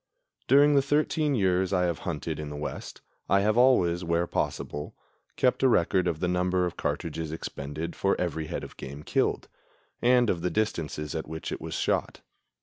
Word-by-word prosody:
During 145 +1 +6
the 140 - +5
thirteen 150 +1 +1
years 95 -3 +2
I 90 -2 +2
have 85 -2 -1
hunted 80 -1 -4
in 75 -1 -5
the 75 - -6
West 75 +1 -6 0.3
I 100 +1 +4
have 105 +1 +2
always, 95 -9 +4
where 85 0 +1
possible, 75 -3 -3 0.4
kept 125 - +2
a 135 - +5
record 90 -5 +2
of 80 -3 -1
the 90 - +1
number 90 0 +1
of 90 - -4
cartridges 80 -2 -3
expended 80 +1 -5
for 100 - +1
every 80 -3 -2
head - - -4
of - - -10
game 70 +2 -8
killed, - - 0 0.5
and 125 0 +4
of 85 - -3
the 90 - 0
distances 80 -6 -2
at 80 - -4
which 80 +1 -6
it - - -5
was - - -5
shot. - - -1
90 Hz, 185 wpm, -27 LUFS, 80-110 Hz, 0.5 s, During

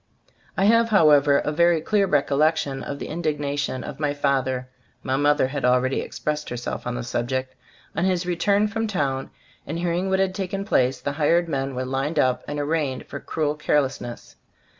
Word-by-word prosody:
I 195 - +3
have, 230 +2 +4
however, 150 -8 +5
a 150 - -1
very 170 +1 +3
clear 200 +4 +1
recol 140 -2 +1
lection 155 -3 +1
of 140 - -5
the - - -6
indignation 145 -4 -2
of - - -7
my 145 -1 0
fath 140 -2 +1
er 130 -1 -3 0.4
(my 130 - 0
mother 145 -1 +3
had 140 0 -4
already 125 +1 +2
expressed 150 0 -4
herself 120 0 -5
on 125 - -2
the 125 - -4
subject), 130 +2 -2 0.4
on 165 - +1
his 180 -1 +1
return 200 +4 +2
from 225 +1 -2
town 135 -9 -1 0.4
and 160 - -3
hearing 175 +2 -1
what 190 - +2
had 190 -1 +1
taken 195 +1 -3
place. 130 -10 +2
The 140 - -3
hired 165 +4 +2
men 135 -3 -2
were 130 +1 -2
lined 135 +4 -2
up 130 -3 +2
and 145 0 -3
arraigned 145 -3 -1
for - - -7
"cruel 150 -2 -1
carelessness." 135 -5 -2
145 Hz, 185 wpm, -24 LUFS, 135-170 Hz, 0.4 s, however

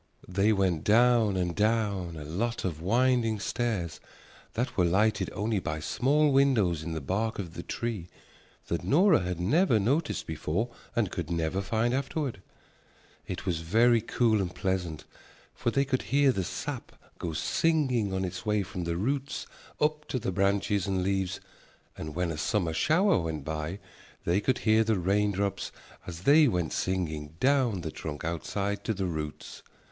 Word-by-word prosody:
They 100 +4 +2
went 95 -6 +1
down 115 -2 +4
and 90 -2 -1
down 105 -6 0
a 75 - -6
lot 105 +11 -2
of 80 -4 -3
winding 115 +2 +2
stairs 100 -8 -2 0.5
that 120 +3 -2
were 90 - +3
lighted 100 +6 +2
only 105 0 -1
by 80 -3 -3
small 145 - +2
windows 115 - +3
in 80 +1 -4
the 80 - -2
bark 110 - -1
of 90 -5 -5
the - - -6
tree 110 -7 -4 0.6
that 85 - -2
Nora 175 +4 +5
had 90 -1 -3
never 120 - +3
noticed 140 +10 0
before 85 +9 -2 0.2
and 110 -6 +1
could 85 -3 -4
never 85 +2 -1
find 110 +4 0
afterward. 135 - -2 0.9
It - - -5
was 85 -4 0
very 115 +7 +4
cool 110 -2 +2
and 90 -2 -4
pleasant, 90 -5 -2 0.5
for - - -1
they 140 +3 +1
could 130 -1 0
hear 140 0 +3
the 95 -6 -1
sap - - -5 0.3
go 85 - -3
singing 125 - +1
on 95 0 -1
its 95 +1 -5
way 105 -1 +1
from 95 -2 -5
the 85 0 -1
roots 135 +7 -2 0.3
up 150 0 0
to - - -2
the 110 -6 -2
branches 100 0 +1
and 95 -2 0
leaves 95 -1 -1 0.6
and 75 -1 -7
when 90 -1 0
a 75 - -5
summer 90 -4 0
shower 180 - +3
went 80 -4 -4
by 80 +3 -3 0.5
they 90 +4 +2
could 130 +4 +1
hear 110 0 +5
the 110 -2 +1
raindrops 100 +2 0 0.4
as 85 -1 -7
they 145 - +6
went 90 - -1
singing 80 -5 -2
down 130 -8 +2
the 80 -1 -4
trunk 75 0 -6
outside 100 +5 -2
to 110 - -1
the 95 0 -2
roots. 80 -4 -5
100 Hz, 165 wpm, -29 LUFS, 85-120 Hz, 0.9 s, they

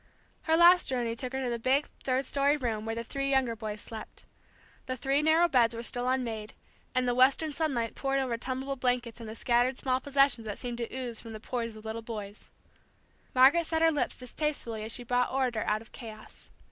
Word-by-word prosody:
Her 320 - +5
last 350 +1 +7
journey 240 -3 -1
took 250 +1 -4
her 265 0 -2
to 250 - -1
the 235 - -2
big, 265 +5 +2 0.2
third 260 +1 0
story 280 +2 +2
room 225 -5 -3
where 225 - -2
the 230 - -3
three 275 +3 -2
younger 265 -4 +2
boys 210 -1 -5
slept. 220 -1 -9 0.6
The 255 0 -3
three 270 +3 +1
narrow 320 +3 +4
beds 240 -6 +3
were 230 - -5
still 245 +1 0
unmade, 230 -5 -2 0.4
and 255 0 +2
the 245 - +2
western 270 +5 +3
sunlight 270 -8 -1
poured 275 0 -1
over 260 -3 0
tumbled 260 +3 -4
blankets 245 -2 0
and 225 -2 -7
the 220 - -7
scattered 245 +2 +2
small 255 -1 0
possessions 275 -4 +2
that 205 - -4
seem 245 -1 -4
to 235 -1 -4
ooze 250 -3 -4
from 225 -1 -9
the 215 - -7
pores 230 0 -4
of 215 0 -12
little 220 +1 -4
boys, 210 -3 -8 0.9
Margaret 280 +6 +6
set 320 0 +1
her 325 - +6
lips 295 - -1
distastefully 250 -4 -3
as 220 - -4
she 245 - -1
brought 245 +1 +1
order 255 -4 0
out 215 +1 0
of 225 - -20
chaos. 220 -3 -11
250 Hz, 210 wpm, -29 LUFS, 230-270 Hz, 0.9 s, last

